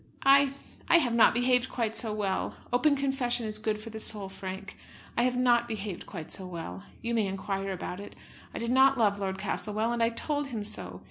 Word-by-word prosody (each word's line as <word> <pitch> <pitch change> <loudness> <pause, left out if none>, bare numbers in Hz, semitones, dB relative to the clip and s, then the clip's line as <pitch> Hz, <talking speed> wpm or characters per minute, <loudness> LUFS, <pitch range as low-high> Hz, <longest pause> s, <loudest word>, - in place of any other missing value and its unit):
I 275 0 +6 0.4
I 345 - +8
have 255 -8 +2
not 235 - +6
behaved 250 +1 +2
quite 225 -3 -2
so 225 -3 0
well. 200 -3 -1 0.2
Open 285 +4 +4
confession 270 -4 0
is 215 0 -2
good 215 0 -1
for 225 +1 -9
the 220 - -6
soul. 205 -3 +1
Frank, 190 +1 -7 0.4
I - - +2
have 250 0 +1
not 240 -1 +3
behaved 210 -5 -5
quite 165 -5 -8
so 190 -2 -5
well. 165 - -7 0.2
You 235 0 -1
may 220 -3 +2
inquire 195 0 -3
about 180 0 -5
it. 205 - -9 0.4
I - - -7
did 235 +1 -1
not 265 +1 +5
love 205 -3 +2
Lord 190 -1 -2
Castlewell, 210 +3 -1
and 240 -1 -1
I 230 - +4
told 290 +4 -2
him 230 -6 -4
so. 90 - -4
220 Hz, 210 wpm, -29 LUFS, 195-245 Hz, 0.4 s, I